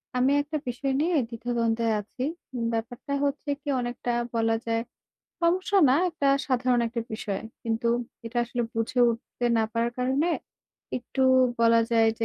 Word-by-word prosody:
আমি 255 +2 +3
একটা 300 +2 -3
বিষয় 250 +3 -1
নিয়ে 340 +2 +1
দ্বিধা-দ্বন্দ্বে 230 -1 -1 0.2
আছি। 250 +5 -7 0.5
ব্যাপারটা 235 +5 -4
হচ্ছে 285 +1 -2
কি - - -17
অনেকটা 245 0 -3 0.2
বলা 225 0 +2
যায়, 230 0 0 0.6
সমস্যা 370 +4 +2
না 255 - +5
একটা 325 -5 0 0.2
সাধারণ 255 -2 +2
একটা 235 +1 -3
বিষয়। 200 -2 -3 0.2
কিন্তু 230 +1 -1 0.4
এটা 235 +1 -2
আসলে 240 +1 -2
বুঝে 225 +3 0
উঠতে 235 +1 -5
না - - +3
পারার 230 0 +1
কারণে, 265 +6 +1 0.7
একটু 265 +2 -3 0.4
বলা 230 0 +5
যায় 225 -1 +4
যে 225 - 0
240 Hz, 145 wpm, -27 LUFS, 230-270 Hz, 0.7 s, না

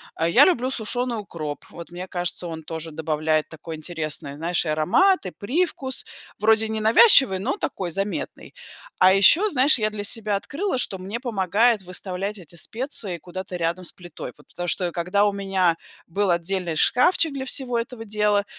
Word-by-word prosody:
А 165 - 0
я 250 +12 +6
люблю 260 -8 +1
сушеный 245 0 -1
укроп, 155 -7 -6
вот 170 0 -11
мне 180 +2 -7
кажется, 175 -1 -3
он 160 -1 -7
тоже 160 +1 -6
добавляет 155 0 -1
такой 160 0 -8
интересный, 155 -3 -5
знаешь, 170 +3 -1
и - - -2
аромат, 185 - +2
и - - -6
привкус, 265 - -1 0.3
вроде 220 +1 +3
ненавязчивый, 220 - +6
но 240 - -2
такой, 190 - -4
заметный. 195 - -4 0.4
А 185 +1 +6
еще, 295 - +6
знаешь, 275 -1 +4
я 215 -2 0
для 210 -1 -5
себя 210 -1 -1
открыла, 300 - -3
что 195 - 0
мне 195 +5 -6
помогает 220 -1 +1
выставлять 190 +2 -4
эти 170 -1 -13
специи 220 - -3
куда-то 185 +2 -7
рядом 170 +1 -2
с - - +3
плитой, 175 -1 -10
вот - - -22
потому 175 0 -6
что 175 +1 +1
когда 180 +4 0
у 205 - +2
меня 190 -4 0 0.3
был 195 +2 0
отдельный 175 0 -1
шкафчик 320 - +4
для 270 -1 -4
всего 255 -2 0
этого 230 0 -5
дела, 210 -1 +1
195 Hz, 170 wpm, -23 LUFS, 175-235 Hz, 0.4 s, я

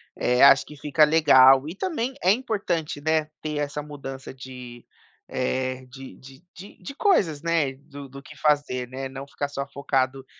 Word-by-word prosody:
eh, 125 +1 +1
acho 140 0 +7
que 150 - -12
fica 150 +2 +2
legal 135 -3 +6
e 165 - -7
também 265 - -3
é 185 - +5
importante, 200 - -2
né, 155 0 +1 0.2
ter 155 -1 -4
essa 145 0 -3
mudança 135 -3 -9
de, 125 -2 -11 0.4
eh, 130 0 -3
de 135 +1 -11
de 135 +4 -16
de 195 +3 -13
de 275 - -8
coisas, 180 - +1
né, 165 -5 0
do 140 +1 -12
do 140 +1 -11
que - - -14
fazer, 145 -4 0
né, 130 +1 -6
não 135 +1 -8
ficar 145 0 -4
só 140 -1 -5
focado 135 -1 -2
140 Hz, 175 wpm, -24 LUFS, 130-155 Hz, 0.4 s, acho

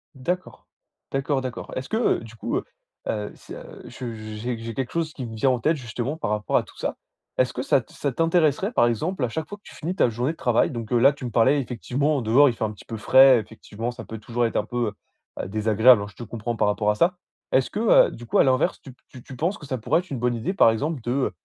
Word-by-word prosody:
D'accord. 180 +8 -4 0.4
D'accord, 135 0 0
d'accord. 130 -2 -6
Est-ce 130 - -5
que, 220 - 0
heu, 240 - +2
du 115 0 -12
coup, - - -2
heu - - -2 0.4
heu, 105 -1 -2
c' - - -12 0.3
je 125 -3 -7
j'ai 110 +2 -5
j'ai 115 0 -6
quelque 130 -2 -3
chose 165 -2 -1
qui 130 - -6
me 115 -1 -7
vient 130 +5 +2
en 125 - +1
tête, 155 +8 +2
justement, 125 +4 -4
par 115 - -3
rapport 105 -2 +1
à - - +1
tout - - -18
ça. - - -3 0.4
Est-ce - - +2
que - - -3
ça - - +3
t - - -20
ça 140 - -1
t'intéresserait, 165 - +2
par 120 - +4
exemple, 140 - -1
à - - -4
chaque 155 +6 -4
fois 205 - -7
que 205 - -37
tu - - -13
finis 175 +4 -4
ta 125 - +3
journée 125 +7 -1
de - - -19
travail- 120 -3 +2
donc 115 -2 -6
heu 120 - +3
là, 135 +4 +6
tu 140 -2 -8
me 120 - -4
parlais 130 +6 +4
effectivement, 135 +4 -1
dehors, 130 +6 +5
il - - -1
fait - - -4
un 110 - -3
petit 105 - -14
peu 115 - -6
frais, 130 +3 +7
effectivement, 110 +1 -6
ça 120 - -9
peut 110 -1 -7
toujours 120 +2 -1
être 115 - -2
un 105 - 0
peu, 120 -3 -2 0.5
heu, - - -5
désagréable, 110 +3 +5
hein, 105 - -6
je - - -19
te 120 - -8
comprends 115 +1 -4
par 105 - +2
rapport 105 0 +2
à 105 - -2
ça- 175 +10 +2 0.4
est-ce 130 - +3
que, 205 - -3
heu, 225 - +5
du 120 - -10
coup, - - +1
à - - +7
l'inverse, 130 -1 +2
tu 135 - -10
p - - -32
tu 125 -1 -12
tu 130 - -10
penses 175 - -1
que 150 - -11
ça 130 -2 -3
pourrait 110 - +2
être 180 - -19
une 130 - -3
bonne 120 0 +1
idée, 115 +12 -2
par 155 - +6
exemple, 145 +5 -2
de 120 - -2
heu, 135 0 0
125 Hz, 275 wpm, -24 LUFS, 115-145 Hz, 0.5 s, frais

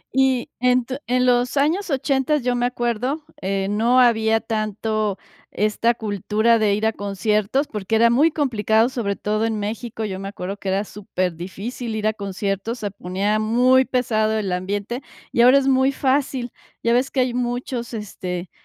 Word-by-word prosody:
Y 265 -2 +2
en 250 0 +3
tu 260 +1 -4
en 250 +1 +2
los 245 +2 +2
años 330 +8 +1
ochentas, 275 0 +1
yo 250 0 +1
me 245 0 +1
acuerdo, 250 +5 -2 0.2
eh, 195 0 -1
no 230 +5 +3
había 225 -2 +4
tanto 215 -1 -2 0.3
esta 215 +3 +1
cultura 215 +2 +1
de 210 -2 +2
ir 210 +2 -1
a 220 - +2
conciertos, 210 +6 0
porque 210 0 -2
era 230 +1 +5
muy 285 +7 +4
complicado, 230 -6 +1
sobre 220 -6 -2
todo 215 +2 -1
en 220 -1 -2
México, 220 +2 -4
yo 190 -2 -4
me 195 - -5
acuerdo 195 0 -5
que 195 - -5
era 195 +2 +1
superdifícil 195 +4 -4
ir 215 -1 -3
a 215 - +2
conciertos, 200 +2 -3
se 205 -2 -3
ponía 195 +3 -1
muy 250 +4 +4
pesado 220 -4 +1
el 200 -3 -2
ambiente, 200 +7 -3 0.3
y 235 - +2
ahora 250 +3 +7
es 275 -1 +1
muy 265 0 +3
fácil. 265 -3 0 0.3
Ya 235 - +3
ves 255 +3 +2
que 265 - 0
hay 250 -1 0
muchos, 245 -1 -3
este, 185 -4 -5
225 Hz, 175 wpm, -22 LUFS, 205-250 Hz, 0.3 s, ahora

